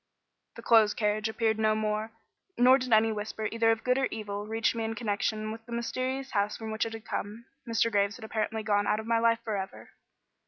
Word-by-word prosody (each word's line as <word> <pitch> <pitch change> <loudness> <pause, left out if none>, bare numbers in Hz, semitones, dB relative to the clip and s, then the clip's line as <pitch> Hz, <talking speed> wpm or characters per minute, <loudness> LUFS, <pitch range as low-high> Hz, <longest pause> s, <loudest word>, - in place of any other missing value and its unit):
The - - -10
closed 220 -3 +5
carriage 210 0 0
appeared 220 -1 0
no 215 0 +3
more; 215 +1 -1 0.5
nor 255 +2 +6
did 250 -1 -4
any 220 0 +5
whisper 215 0 -3
either 230 0 +2
of 225 0 +1
good 250 +1 +2
or 270 - +2
evil 205 -1 -5
reach 225 +1 +1
me 230 -1 -3
in 225 0 -3
connection 215 -1 -2
with 225 +1 -8
the - - -11
mysterious 255 +3 -3
house 205 0 0
from 220 -1 -6
which 220 +1 -1
it 225 - -7
had 225 -1 -8
come. 215 +3 -5 0.2
Mr. 230 0 +2
Graves 200 0 +1
had 225 - -9
apparently 220 0 -2
gone 205 -1 +1
out 210 - +2
of 220 - -6
my 230 0 +2
life 230 0 +2
for 215 -2 -2
ever. 190 -1 -6
220 Hz, 225 wpm, -29 LUFS, 215-230 Hz, 0.5 s, nor